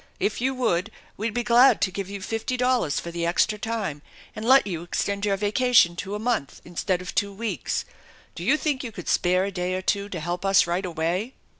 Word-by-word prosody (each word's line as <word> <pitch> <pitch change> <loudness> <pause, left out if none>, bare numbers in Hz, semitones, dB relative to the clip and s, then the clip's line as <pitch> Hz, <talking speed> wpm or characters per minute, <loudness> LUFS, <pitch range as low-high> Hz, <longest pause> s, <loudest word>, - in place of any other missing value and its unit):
If 210 - -1
you 265 +1 0
would 220 -6 0 0.3
we'd 220 +2 -3
be 240 - 0
glad 240 +3 +6
to 185 - +2
give 195 +1 -5
you 200 -1 -6
fifty 225 +4 -2
dollars 250 - +1
for 170 - -6
the 170 0 -3
extra 195 +5 +1
time, 210 -10 -3 0.3
and 215 - -6
let 260 +4 +6
you 175 -5 -4
extend 200 +4 -2
your 195 -1 +1
vacation 210 -3 +4
to 200 +2 -4
a - - -2
month 220 - -2
instead 175 +1 -2
of 180 - -7
two 200 -2 0
weeks. 220 +3 -3 0.5
Do - - -7
you 305 - +3
think 290 -4 -1
you 235 - -5
could 180 -5 -9
spare 185 +1 +2
a 200 - -3
day 180 -1 -2
or 185 - -3
two 200 +1 0
to 180 - -5
help 175 +3 -3
us 195 -1 +5
right 175 +2 -1
away?" 175 +8 -2
200 Hz, 225 wpm, -25 LUFS, 180-230 Hz, 0.5 s, glad